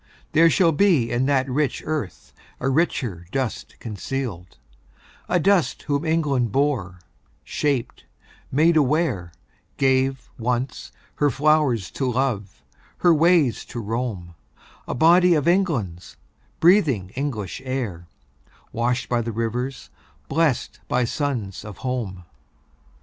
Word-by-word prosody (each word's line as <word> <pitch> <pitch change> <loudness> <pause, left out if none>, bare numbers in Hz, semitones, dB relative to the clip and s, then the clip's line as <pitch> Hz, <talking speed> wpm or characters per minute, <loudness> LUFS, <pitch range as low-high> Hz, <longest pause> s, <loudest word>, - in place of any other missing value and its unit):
There 165 +2 +6
shall 165 +2 +4
be 150 - +3
In 125 +2 +1
that 135 -2 +2
rich 140 +2 -1
earth 150 - -4 0.3
a 130 - 0
richer 125 - -1
dust 130 -4 -3
concealed; 105 -3 -5 0.7
A 180 - +3
dust 190 -1 +2
whom 145 +1 -1
England 145 -8 +1
bore, 120 -11 0 0.4
shaped, 140 -5 -2 0.5
made 160 +5 +4
aware, 135 - +1 0.5
Gave, 135 -1 +1
once, 125 +3 -2 0.3
her 145 - +3
flowers 140 - +2
to 130 -2 -1
love, 120 -6 -2 0.3
her 175 -2 +4
ways 160 - +3
to 120 - -7
roam, 110 -6 -4 0.5
A - - -3
body 175 +5 +5
of 150 -1 0
England's, 135 - 0 0.4
breathing 150 - +3
English 120 - -4
air, 115 -11 -4 0.6
Washed 120 +2 -1
by 120 -1 +1
the 115 0 -3
rivers, 120 +4 -3 0.4
blest 155 -4 0
by 125 - +1
suns 120 -7 -3
of 105 -4 -9
home. 110 -8 -3
130 Hz, 115 wpm, -23 LUFS, 115-150 Hz, 0.7 s, There